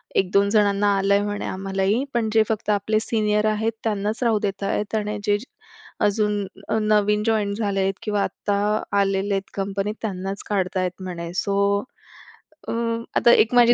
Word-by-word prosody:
"1-2 200 Hz, +2 st, +3 dB
जणांना 205 Hz, -1 st, +3 dB
आलंय 200 Hz, +1 st, +3 dB
म्हणे 205 Hz, 0 st, -3 dB
आम्हालाही, 195 Hz, +5 st, -1 dB
पण 225 Hz, -2 st, 0 dB
जे 220 Hz, -1 st, +5 dB
फक्त 220 Hz, -1 st, -2 dB
आपले 210 Hz, +2 st, +1 dB
सीनियर 210 Hz, -2 st, +1 dB
आहेत, 220 Hz, +1 st, 0 dB
त्यांनाच 210 Hz, +1 st, -1 dB
राहू 225 Hz, -3 st, +3 dB
देत 200 Hz, -1 st, -3 dB
आहेत 210 Hz, +2 st, -1 dB
आणि 210 Hz, -1 st, -1 dB
जे 205 Hz, 0 st, +2 dB, 0.6 s
अजून 210 Hz, 0 st, +1 dB, 0.3 s
अ, -, -, +1 dB
नवीन 210 Hz, 0 st, +2 dB
जॉईंट 210 Hz, -2 st, +1 dB
झालेत 195 Hz, -3 st, 0 dB
किंवा 210 Hz, -2 st, 0 dB
आत्ता 205 Hz, -, -2 dB, 0.5 s
आलेले 195 Hz, 0 st, +1 dB
आहेत 195 Hz, 0 st, -2 dB
कंपनीत 200 Hz, +2 st, -2 dB
त्यांनाच 195 Hz, -2 st, -4 dB
काढता 190 Hz, -2 st, 0 dB
आहेत 180 Hz, +1 st, -3 dB
म्हणे." 170 Hz, -2 st, -5 dB
सो 200 Hz, +1 st, 0 dB, 1.1 s
अ, -, -, -1 dB, 0.4 s
आता 235 Hz, -, +5 dB
एक 230 Hz, -, +4 dB
माझी 240 Hz, 0 st, +7 dB
205 Hz, 155 wpm, -23 LUFS, 195-215 Hz, 1.1 s, माझी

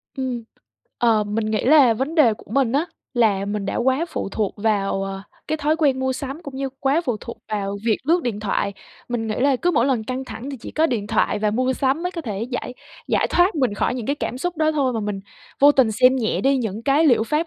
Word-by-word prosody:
Ừm, 255 Hz, -4 st, -3 dB, 0.6 s
ờ, 225 Hz, -3 st, +3 dB
mình 215 Hz, +1 st, -2 dB
nghĩ 215 Hz, -1 st, -1 dB
là 265 Hz, -4 st, +6 dB
vấn 270 Hz, +7 st, -3 dB
đề 245 Hz, -10 st, +5 dB
của -, -, -17 dB
mình 260 Hz, -1 st, +1 dB
á 300 Hz, +5 st, +1 dB, 0.3 s
là 210 Hz, -5 st, +2 dB
mình 205 Hz, 0 st, -3 dB
đã -, -, -2 dB
quá 260 Hz, +6 st, +1 dB
phụ 315 Hz, -, -4 dB
thuộc 205 Hz, 0 st, -2 dB
vào, 200 Hz, -2 st, 0 dB
ờ, 195 Hz, 0 st, -5 dB, 0.3 s
cái 315 Hz, -, 0 dB
thói 305 Hz, +2 st, +1 dB
quen 280 Hz, -5 st, +2 dB
mua 260 Hz, 0 st, 0 dB
sắm 275 Hz, +5 st, -6 dB
cũng 280 Hz, -4 st, -8 dB
như 270 Hz, 0 st, -2 dB
quá 280 Hz, +4 st, +2 dB
phụ 245 Hz, -7 st, -1 dB
thuộc 235 Hz, -, -8 dB
vào 200 Hz, -2 st, -2 dB
việc 225 Hz, -2 st, +2 dB
lướt 335 Hz, +4 st, +2 dB
điện 220 Hz, -4 st, -3 dB
thoại, 200 Hz, -1 st, -1 dB, 0.4 s
mình 240 Hz, -2 st, -2 dB
nghĩ 215 Hz, -, -2 dB
là 275 Hz, 0 st, +3 dB
cứ 350 Hz, +7 st, +1 dB
mỗi 250 Hz, -5 st, +2 dB
lần 245 Hz, -5 st, 0 dB
căng 255 Hz, +3 st, -4 dB
thẳng 255 Hz, +3 st, -7 dB
thì 275 Hz, -, -5 dB
chỉ -, -, -8 dB
có 320 Hz, +1 st, +2 dB
điện 220 Hz, -7 st, -2 dB
thoại 215 Hz, -1 st, +1 dB
và 210 Hz, 0 st, +1 dB
mua 255 Hz, +4 st, +1 dB
sắm 270 Hz, +5 st, 0 dB
mới 360 Hz, -, -1 dB
có 335 Hz, -, -4 dB
thể 210 Hz, -6 st, -4 dB
giải 250 Hz, +1 st, -4 dB, 0.3 s
giải -, -, +2 dB
thoát 355 Hz, +3 st, +3 dB
mình 255 Hz, -9 st, +1 dB
khỏi 250 Hz, -, 0 dB
những 240 Hz, -4 st, -5 dB
cái 285 Hz, -, 0 dB
cảm 250 Hz, -, -4 dB
xúc 355 Hz, +3 st, -3 dB
đó 315 Hz, 0 st, +2 dB
thôi 275 Hz, -4 st, +1 dB
mà 225 Hz, -, -2 dB
mình 205 Hz, -2 st, -3 dB, 0.4 s
vô 290 Hz, +1 st, +8 dB
tình 250 Hz, -6 st, +3 dB
xem 255 Hz, +4 st, +4 dB
nhẹ 220 Hz, -7 st, 0 dB
đi 270 Hz, +5 st, +3 dB
những 220 Hz, -3 st, -3 dB
cái 285 Hz, +5 st, +3 dB
liệu 235 Hz, -4 st, +4 dB
pháp 310 Hz, +6 st, 0 dB
250 Hz, 255 wpm, -22 LUFS, 215-280 Hz, 0.6 s, vô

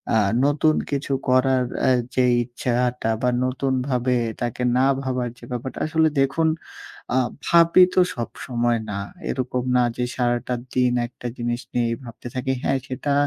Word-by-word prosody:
আ -, -, +5 dB, 0.3 s
নতুন 150 Hz, +2 st, +3 dB, 0.2 s
কিছু 140 Hz, 0 st, -2 dB, 0.2 s
করার 130 Hz, 0 st, +3 dB, 0.2 s
এ্যা 130 Hz, -, +4 dB, 0.2 s
যেই 125 Hz, -1 st, +4 dB
ইচ্ছা 125 Hz, +1 st, -4 dB
আ -, -, +2 dB
টা 115 Hz, -, +1 dB
বা 125 Hz, -, +2 dB, 0.2 s
নতুনভাবে 130 Hz, -1 st, 0 dB, 0.3 s
তাকে 120 Hz, +1 st, -2 dB
না 130 Hz, -, +4 dB, 0.2 s
ভাবার 130 Hz, -2 st, -2 dB
যে -, -, -19 dB
ব্যাপারটা। 125 Hz, +1 st, -4 dB
আসলে 160 Hz, 0 st, +3 dB
দেখুন 135 Hz, +4 st, +2 dB, 0.7 s
আ -, -, +3 dB, 0.3 s
ভাবি 170 Hz, +2 st, +6 dB
তো 185 Hz, -, +6 dB
সবসময় 120 Hz, -1 st, -1 dB
না। 100 Hz, -, -3 dB, 0.3 s
এরকম 125 Hz, -1 st, -2 dB
না 125 Hz, -, +4 dB
যে 125 Hz, -, 0 dB
সারাটা 120 Hz, 0 st, 0 dB, 0.2 s
দিন 125 Hz, -1 st, +3 dB
একটা 120 Hz, 0 st, -8 dB
জিনিস 120 Hz, 0 st, -2 dB
নিয়েই 120 Hz, -1 st, +1 dB
ভাবতে 115 Hz, 0 st, -9 dB
থাকি। 130 Hz, +1 st, -1 dB
হ্যাঁ, 135 Hz, -, +1 dB
সেটা 135 Hz, +2 st, -2 dB
125 Hz, 160 wpm, -23 LUFS, 120-135 Hz, 0.7 s, ভাবি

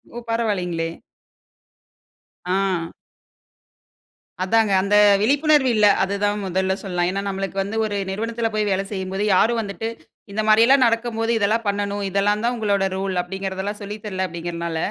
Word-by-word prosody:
ஓ! 240 Hz, -, -5 dB
பரவாயில்லைங்களே. 185 Hz, -8 st, -1 dB, 1.6 s
அ. 180 Hz, -2 st, -1 dB, 1.5 s
அதாங்க 215 Hz, +1 st, +2 dB
அந்த 200 Hz, +2 st, +1 dB, 0.3 s
விழிப்புணர்வு 285 Hz, +3 st, +3 dB
இல்ல. 210 Hz, -1 st, +4 dB, 0.2 s
அதுதான் 205 Hz, +1 st, -1 dB
முதல்ல 190 Hz, +1 st, 0 dB
சொல்லலாம். 180 Hz, -3 st, -1 dB
ஏன்னா 195 Hz, +1 st, -2 dB
நமக்கு 195 Hz, 0 st, -4 dB
வந்து 205 Hz, +3 st, -5 dB
ஒரு 210 Hz, -1 st, -3 dB, 0.2 s
நிறுவனத்தில 225 Hz, +3 st, -2 dB
போய் 215 Hz, -1 st, 0 dB
வேலை 195 Hz, +1 st, 0 dB
செய்யும்போது 190 Hz, 0 st, -3 dB
யாரும் 230 Hz, +5 st, +3 dB
வந்துட்டு, 210 Hz, +2 st, -4 dB, 0.4 s
இந்த 215 Hz, -, 0 dB
மாரியெல்லா 230 Hz, +5 st, +6 dB
நடக்கும் 230 Hz, 0 st, 0 dB
போது, 225 Hz, +1 st, 0 dB
இதெல்லாம் 220 Hz, +3 st, +1 dB
பண்ணனும், 200 Hz, 0 st, -1 dB
இதெல்லாம் 205 Hz, +3 st, +1 dB
தான் 245 Hz, +1 st, +1 dB
உங்களோட 200 Hz, -3 st, +1 dB
ரூல். 190 Hz, -1 st, -2 dB
அப்படிங்கிறதெல்லா 190 Hz, +2 st, -4 dB
சொல்லித் 205 Hz, +1 st, -7 dB
தரல 190 Hz, -2 st, -2 dB
அப்படீங்கறனால, 170 Hz, -1 st, -4 dB
200 Hz, 135 wpm, -22 LUFS, 190-220 Hz, 1.6 s, மாரியெல்லா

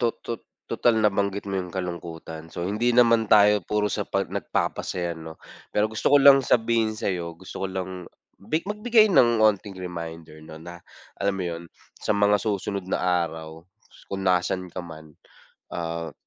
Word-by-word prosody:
to 120 Hz, -, +3 dB, 0.2 s
to 115 Hz, -1 st, -4 dB, 0.3 s
total 115 Hz, -2 st, +2 dB
nabanggit 100 Hz, -1 st, +1 dB
mo 100 Hz, -, -3 dB
yung 90 Hz, -, -9 dB
kalungkutan 85 Hz, -3 st, -6 dB
so, 85 Hz, +1 st, -4 dB
hindi 110 Hz, +5 st, +1 dB
naman 115 Hz, -2 st, +4 dB
tayo 105 Hz, -1 st, +6 dB
puro 105 Hz, +4 st, 0 dB
sa -, -, -1 dB
pag -, -, 0 dB
nagpapasaya 85 Hz, -2 st, -2 dB
'no? 80 Hz, 0 st, -10 dB, 0.3 s
Pero 105 Hz, -, +2 dB
gusto 110 Hz, 0 st, -1 dB
ko 145 Hz, -, +7 dB
lang 140 Hz, 0 st, +8 dB
sabihin 115 Hz, -2 st, +1 dB
sayo, 85 Hz, -5 st, -3 dB
gusto 95 Hz, 0 st, -8 dB
ko 95 Hz, -, 0 dB
lang 95 Hz, 0 st, -3 dB, 0.5 s
mag 155 Hz, +11 st, -2 dB
magbigay 215 Hz, 0 st, +3 dB
ng 120 Hz, -7 st, +5 dB
'onting 100 Hz, -2 st, +1 dB
reminder 85 Hz, -3 st, -7 dB
'no, 80 Hz, 0 st, -11 dB
na 85 Hz, +2 st, -10 dB, 0.4 s
alam 100 Hz, 0 st, +1 dB
mo 90 Hz, -, -2 dB
'yon, 85 Hz, -1 st, -4 dB, 0.4 s
sa -, -, -3 dB
mga 105 Hz, 0 st, +4 dB
susunod 100 Hz, -2 st, -2 dB
na -, -, 0 dB
araw, 80 Hz, -3 st, -2 dB, 0.5 s
kung 95 Hz, 0 st, -3 dB
nasan 90 Hz, 0 st, 0 dB
ka 90 Hz, -, -4 dB
man, 80 Hz, -2 st, -11 dB, 0.6 s
ah, 85 Hz, -1 st, -4 dB
95 Hz, 165 wpm, -25 LUFS, 85-110 Hz, 0.6 s, lang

